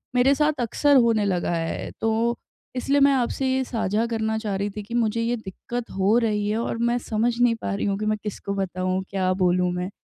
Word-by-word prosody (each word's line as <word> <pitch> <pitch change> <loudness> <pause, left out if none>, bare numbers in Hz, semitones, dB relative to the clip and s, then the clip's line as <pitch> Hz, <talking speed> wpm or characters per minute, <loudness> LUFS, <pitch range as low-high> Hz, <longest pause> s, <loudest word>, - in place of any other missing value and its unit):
मेरे 265 +3 +4
साथ 300 -2 +1
अक्सर 285 +5 +2
होने 230 -4 +3
लगा 180 -3 0
है, 165 0 -3
तो 225 +2 +1 0.4
इसलिए 275 +3 +1
मैं 280 0 +6
आपसे 260 +1 0
ये 265 0 +1
साझा 225 -2 -1
करना 220 -1 -1
चाह 210 -3 -3
रही 200 +1 -1
थी 210 - -5
कि 220 +4 -10
मुझे 230 -1 +1
ये 235 +1 0
दिक्कत 230 +4 -6
हो 200 +4 +3
रही 210 -2 0
है 215 - 0
और 230 - -2
मैं 235 +1 +1
समझ 230 +2 0
नहीं 245 -1 +4
पा - - -2
रही 200 - -2
हूँ 200 -1 0
कि 215 - -2
मैं 215 0 +1
किसको 200 -1 -4
बताऊँ 185 -1 -1
क्या 185 -1 0
बोलूँ 180 -1 +2
मैं। 180 +1 -3
220 Hz, 220 wpm, -24 LUFS, 195-240 Hz, 0.4 s, मैं